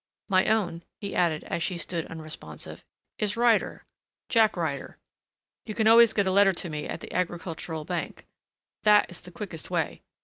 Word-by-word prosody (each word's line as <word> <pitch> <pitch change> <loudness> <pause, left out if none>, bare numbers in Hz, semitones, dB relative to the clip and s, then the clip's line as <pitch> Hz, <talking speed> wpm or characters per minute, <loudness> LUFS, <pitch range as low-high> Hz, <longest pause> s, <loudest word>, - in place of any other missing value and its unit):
My 185 -1 +4
own," 180 -7 +1 0.2
he 200 -1 -5
added, 165 -4 +1
as - - -3
she 175 +2 -1
stood 170 -1 -4
unresponsive, 160 -1 -7 0.4
"is 210 0 -1
Ryder 235 -2 +2 0.4
Jack 220 -5 +4
Ryder. 155 -5 -3 0.7
You 215 - -5
can 220 - +1
always 230 0 +8
get 200 -2 +1
a 190 - +1
letter 195 0 +5
to 175 -1 -4
me 150 0 -4
at - - -5
the - - -9
Agricultural 165 -3 -3
Bank. 175 0 -4 0.6
That 210 -2 +5
is 175 - -6
the 180 - -11
quickest 175 -4 -7
way. 170 -4 -1
180 Hz, 170 wpm, -27 LUFS, 165-210 Hz, 0.7 s, always